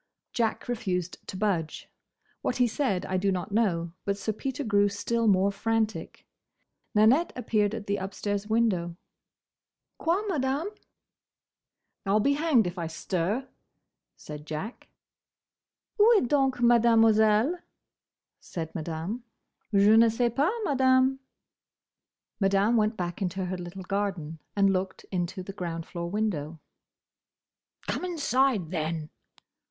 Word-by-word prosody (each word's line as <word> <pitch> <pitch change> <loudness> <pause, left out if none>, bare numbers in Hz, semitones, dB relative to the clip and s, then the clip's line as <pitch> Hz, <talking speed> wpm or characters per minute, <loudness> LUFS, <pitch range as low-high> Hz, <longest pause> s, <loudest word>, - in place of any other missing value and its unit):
Jack 230 -2 -1
refused 185 -8 -2
to 185 - -6
budge. 180 -7 -1 0.5
What 250 - -1
he 250 - +3
said 225 -6 -1
I 185 - -1
do 195 +1 +1
not 185 +2 -3
know; 175 -6 +1
but 200 0 -1
Sir 210 +2 -2
Peter 265 +5 -4
grew 205 -3 +3
still 225 +3 -1
more 195 0 +4
frantic. 220 +2 -2 0.7
Nanette 235 +11 +4
appeared 215 -3 0
at 220 -2 -6
the 200 0 -1
upstairs 200 +1 -3
window. 205 -7 +1 1.0
"Quoi, 345 +5 +1
Madame?" 290 0 -1 1.3
"I 195 - 0
'll 215 - +4
be 280 +6 +3
hanged 290 - +3
if 175 +1 -4
I 165 - -2
stir!" 185 +9 -2 0.7
said 150 0 -9
Jack. 160 +10 -6 1.1
"Où 445 +2 +7
est 250 - +1
donc 270 -1 +2
Mademoiselle?" 225 +3 +4 0.8
said 160 -2 -6
Madame. 165 +8 -4 0.5
"Je 205 +1 +5
ne 230 +1 +6
sais 235 +1 0
pas, 290 +7 +3
Madame." 260 -3 +3 1.2
Madame 195 +3 +3
went 215 0 +2
back 175 +1 -4
into 190 0 -2
her 185 +1 -3
little 180 +2 -7
garden, 185 -5 -3 0.2
and 195 -1 +4
looked 190 0 -3
into 180 0 -2
the 195 - -8
ground 170 -4 -4
floor 170 -1 -5
window. 170 -7 -2 1.3
"Come - - -2
inside, 270 - +1
then!" 160 -2 -3
205 Hz, 125 wpm, -27 LUFS, 180-240 Hz, 1.3 s, Où